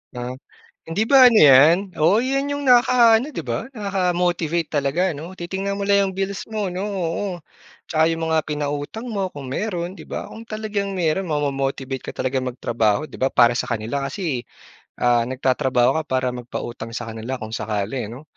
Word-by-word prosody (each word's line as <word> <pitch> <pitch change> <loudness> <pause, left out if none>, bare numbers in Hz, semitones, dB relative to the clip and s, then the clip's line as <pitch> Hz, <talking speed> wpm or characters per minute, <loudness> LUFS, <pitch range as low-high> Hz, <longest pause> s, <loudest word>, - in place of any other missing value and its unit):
Ah. 125 0 -4 0.6
Hindi 200 +7 0
ba 260 -1 +8
ano 230 - +4
'yan? 145 +2 +8 0.2
Oo, 170 +7 +5
'yan 275 +3 0
yung 285 0 -3
nakaka-ano, 240 0 +5
'di - - -6
ba? 235 - -3
Nakaka-motivate 180 - 0
talaga 155 +6 +1
'no? 165 +6 -9
Titingnan 195 +3 -3
mo 200 - -2
lang 200 -1 +3
yung - - -11
bills 195 0 -2
mo 210 -4 -2
'no? 185 - -4
Oo, 185 -1 -2 0.6
'tsaka 160 -1 +2
yung 165 0 -2
mga 160 0 +2
pinautang 145 +8 -3
mo 200 -5 -2
kung 140 -2 -9
mayroon, 180 -1 -3
'di - - -13
ba? - - -5
Kung 225 - -9
talagang 210 -2 -3
mayroon 180 +1 0
mamo-motivate 135 -3 -2
ka - - -6
talagang 130 0 -1
magtrabaho, 115 -1 0
'di - - -17
ba? 130 - +3
Para 120 0 +5
sa - - -2
kanila 115 +4 -2
kasi, 155 -11 -3 0.6
ah, 120 -1 +3
nagtatrabaho 130 +1 +1
ka - - -1
para 130 0 0
magpautang 120 -1 -6
sa 115 - -5
kanila 115 +4 -5
kung 110 - -6
sakali 110 +2 -3
ano? 125 +7 -10
160 Hz, 175 wpm, -22 LUFS, 130-200 Hz, 0.6 s, ba